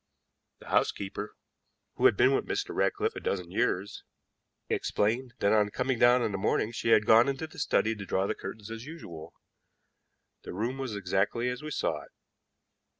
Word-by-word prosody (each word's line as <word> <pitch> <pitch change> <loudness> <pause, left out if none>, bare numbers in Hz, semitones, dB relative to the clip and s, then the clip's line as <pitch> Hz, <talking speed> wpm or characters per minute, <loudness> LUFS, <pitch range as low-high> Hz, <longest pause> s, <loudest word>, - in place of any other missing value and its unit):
The - - -14
housekeeper, 100 +1 -1 0.6
who - - -1
had - - +1
been 130 +2 +5
with - - 0
Mr. 400 0 -2
Ratcliffe 425 +2 0
a - - -4
dozen 90 -3 -3
years, 100 -2 -1 0.6
explained 115 +4 -1
that, 100 - +2
on 105 -1 +3
coming 125 +2 -1
down 120 +1 +5
that 100 -4 -1
morning, 105 +3 +1
she 115 - -2
had 105 -2 +5
gone 115 +5 +6
into 140 +3 -3
the 155 - -12
study 110 - +2
to 100 -2 -7
draw 95 - +1
the 105 - 0
curtains 105 +2 -8
as 115 0 -6
usual. 85 - -10 1.1
The - - -8
room 120 +8 -2
was 130 -5 -3
exactly 100 +5 0
as 125 0 -4
we 155 - -6
saw 150 - -1
it. - - -15
115 Hz, 175 wpm, -29 LUFS, 100-130 Hz, 1.1 s, gone